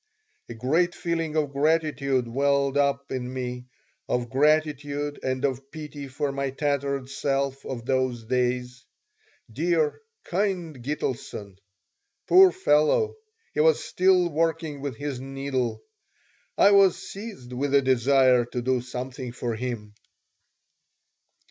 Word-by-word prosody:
A 115 - -6
great 160 +10 +1
feeling 165 -2 -2
of 150 -3 +1
gratitude 140 -4 +1
welled 140 +2 +1
up 140 -1 +1
in 125 -1 -3
me, 125 -1 -5 0.4
of 120 -2 -1
gratitude 145 0 +1
and 130 +1 -1
of 135 0 -3
pity 150 -2 -8
for 140 +2 -2
my 140 0 -2
tattered 140 -1 -1
self 135 0 -1
of 120 -3 -5
those 130 -3 0
days. 125 +1 -1 0.7
Dear, 160 - +1 0.2
kind 180 -7 -2
Gitelson! 120 -8 -4 0.7
Poor 375 0 +8
fellow! 370 - +2 0.4
He - - -3
was 155 0 +4
still 185 -1 +3
working 160 -2 -1
with 140 -3 -4
his 145 -3 -4
needle. 135 - -3 0.7
I 200 - +6
was 195 -2 +6
seized 195 - -9
with 140 +2 0
a 140 - +6
desire 130 -1 +4
to 120 +1 -4
do 130 0 +1
something 125 +1 -6
for 120 -1 -3
him. 110 -3 -5
140 Hz, 125 wpm, -26 LUFS, 125-155 Hz, 0.7 s, Poor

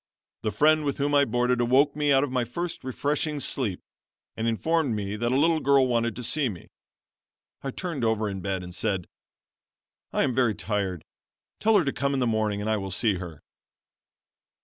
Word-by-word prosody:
The 110 - 0
friend 155 +8 +4
with 140 -2 -1
whom 145 +1 0
I 140 0 +5
boarded 125 +1 +1
awoke 135 +4 +3
me 150 -1 +1
out 135 0 +5
of 145 - -2
my 125 -1 +1
first 160 +9 -5
refreshing 145 +3 -1
sleep, 120 -8 -2 0.5
and 115 +1 -2
informed 145 +2 +1
me 100 -1 -3
that 120 +2 -1
a 130 - +2
little 160 +2 +3
girl 140 -2 +4
wanted 115 -2 0
to 125 - -6
see 140 +2 0
me. 90 -6 -9 0.9
I 135 - -2
turned 160 -2 -4
over 110 -1 +1
in 95 -2 -4
bed 95 0 -2
and 90 0 -9
said: 95 -2 -1 1.0
"'I - - +1
am 130 - +1
very 120 -4 +2
tired, 95 -3 -2 0.5
tell 220 0 +4
her 180 - +2
to 140 - 0
come 140 +1 0
in - - 0
the 125 - +2
morning 110 -3 0
and 105 - -3
I 110 0 +2
will 95 -1 -4
see 100 +1 +1
her.' 85 -5 -9
120 Hz, 195 wpm, -26 LUFS, 105-140 Hz, 1.0 s, I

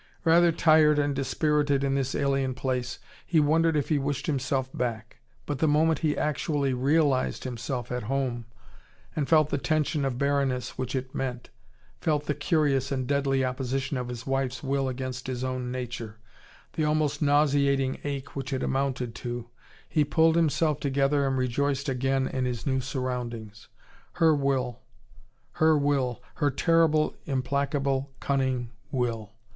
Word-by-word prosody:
Rather 170 +1 +5
tired 155 -2 +5
and 145 -1 +1
dispirited 145 0 +1
in 135 0 +1
this 135 -1 -1
alien 135 -2 0
place, 130 -1 -2 0.3
he 165 - +2
wondered 160 +2 +3
if 145 - -1
he 150 -3 +2
wished 140 0 -2
himself 135 -2 0
back. 115 -3 -3 0.3
But 145 -3 -3
the 160 - +3
moment 155 +2 +3
he 150 -2 0
actually 145 -2 0
realised 135 +1 +1
himself 125 0 -4
at 125 0 -2
home, 130 -4 -1 0.7
and 145 -3 -1
felt 155 -2 +4
the 145 - 0
tension 155 0 0
of 135 -3 -1
barrenness 140 -2 0
which 130 0 -3
it 130 0 -4
meant, 125 -2 -4 0.5
felt 150 -2 0
the 150 - 0
curious 145 -3 +1
and 130 -2 -1
deadly 135 -1 +1
opposition 135 +2 -2
of 125 -1 -3
his 125 -1 -6
wife's 135 -1 -1
will 135 -1 0
against 130 0 -5
his 130 -1 -3
own 130 -1 -3
nature, 120 -4 -5 0.6
the 155 - -1
almost 150 -1 +1
nauseating 140 -2 +2
ache 140 -2 -5
which 135 -1 -4
it 130 - -1
amounted 130 -3 -1
to, 120 -1 -5 0.4
he 155 - +2
pulled 160 +2 +3
himself 155 -2 +2
together 140 0 +1
and 135 -1 0
rejoiced 140 +3 0
again 135 0 0
in 130 -1 -2
his 125 -2 -3
new 130 -2 +1
surroundings. 120 -4 -4 0.5
Her 165 -2 +4
will, 135 -4 0 0.7
her 160 -1 +3
will, 140 -4 0
her 145 -2 +2
terrible, 160 0 +3
implacable, 140 0 0
cunning 130 -3 -1 0.2
will! 115 -5 -2
135 Hz, 150 wpm, -27 LUFS, 130-145 Hz, 0.7 s, Rather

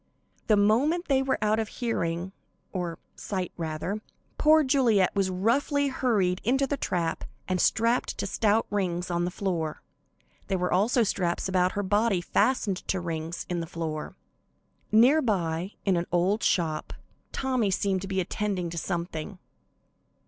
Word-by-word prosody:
The 215 - +4
moment 275 - +2
they 270 -1 +4
were 265 0 0
out 215 +1 +2
of 220 - -1
hearing 180 -7 -2 0.4
(or 175 -3 -3 0.2
sight, 185 -3 -4
rather) 165 +5 -3 0.4
poor 310 +1 +6
Juliet 245 -10 +3
was 195 -1 +1
roughly 275 +9 +1
hurried 205 -9 +1
into 270 +5 +2
the 285 - -1
trap 170 -10 -2 0.2
and 185 -2 0
strapped 230 +2 +1
to - - -2
stout 220 0 +2
rings 180 -3 -1
in 175 0 0
the - - -1
floor. 175 -5 -3 0.6
There 195 - 0
were 180 0 0
also 225 +6 +3
straps 180 -4 -1
about 185 -1 +2
her 205 - -1
body 205 0 +2
fastened 200 +2 +1
to 190 - 0
rings 165 -1 -4
in 175 -1 -2
the 165 - -4
floor. 160 -2 -5 0.8
Near 250 +9 +6
by, 180 - -1
in 195 -2 +3
an 170 - -2
old 185 +5 +2
shop, 160 -4 0 0.4
Tommy 255 -6 0
seemed 190 0 0
to 195 - -5
be 190 -1 -1
attending 185 -2 -2
to 170 - -3
something. 170 +1 -4
195 Hz, 155 wpm, -27 LUFS, 175-225 Hz, 0.8 s, poor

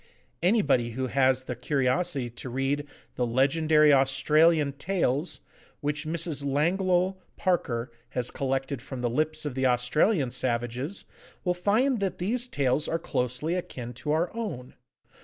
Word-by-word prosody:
Anybody 145 - +2
who 130 +2 -2
has 130 +1 +2
the 125 -1 -5
curiosity 135 +3 0
to 120 +2 -6
read 135 +3 -1 0.3
the 125 - +1
'Legendary 150 +4 +4
Australian 145 +3 +4
Tales,' 155 -1 -1 0.4
which 150 +1 -2
Mrs. 160 -3 -1
Langloh 180 +6 +1 0.2
Parker 125 -11 0 0.3
has 125 0 -1
collected 135 -1 -2
from 130 0 -7
the 120 - 0
lips 155 +4 -1
of 145 - -3
the 130 0 +1
Australian 130 - +2
savages, 125 - -2 0.4
will 180 - +1
find 220 +8 +1
that 195 -2 -2
these 235 +7 0
tales 140 - 0
are 165 - 0
closely 125 +1 -1
akin 125 -9 -5
to 150 +5 -3
our 165 +6 0
own. 165 - -5
145 Hz, 140 wpm, -27 LUFS, 130-170 Hz, 0.4 s, Legendary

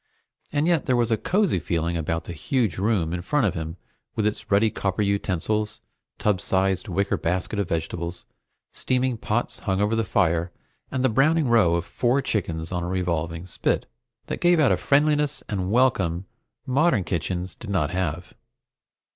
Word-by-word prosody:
And 145 +1 +1
yet 170 -4 +2
there 130 - +3
was 120 -1 +1
a - - +5
cosy 185 - +1
feeling 85 +1 -1
about 80 0 -1
the 85 - -7
huge 105 - -1
room 95 -6 +1
in 90 - -2
front 145 - +1
of 95 - +1
him 80 +1 -5 0.4
with 110 - 0
its 105 - -2
ruddy 105 +2 +4
copper 95 +1 -1
utensils, 100 +2 -1 0.4
tub 100 -3 +1
size 95 -1 +1
wicker 100 +3 0
basket 90 +6 -1
of 100 - -1
vegetables, 85 +1 -3 0.5
steaming 130 0 0
pots 115 +1 -2
hung 95 -1 -1
over 105 +2 +2
the 115 - +1
fire, 85 -4 +1 0.4
and 130 - -2
the - - +5
browning 150 +6 +3
row 110 -8 +4
of 85 0 -1
four 120 +8 +1
chickens 85 -10 -2
on 90 -1 -1
a 85 - -3
revolving 85 -2 -2
spit, 90 - -1 0.4
that - - -5
gave 175 -1 +4
out 150 - +5
a - - +3
friendliness 145 0 +2
and 95 -3 -2
welcome 100 -8 +2 0.4
modern 135 - +2
kitchens 90 +2 -3
did 110 - -10
not 80 -6 0
have. 90 -2 -3
100 Hz, 170 wpm, -24 LUFS, 85-120 Hz, 0.5 s, a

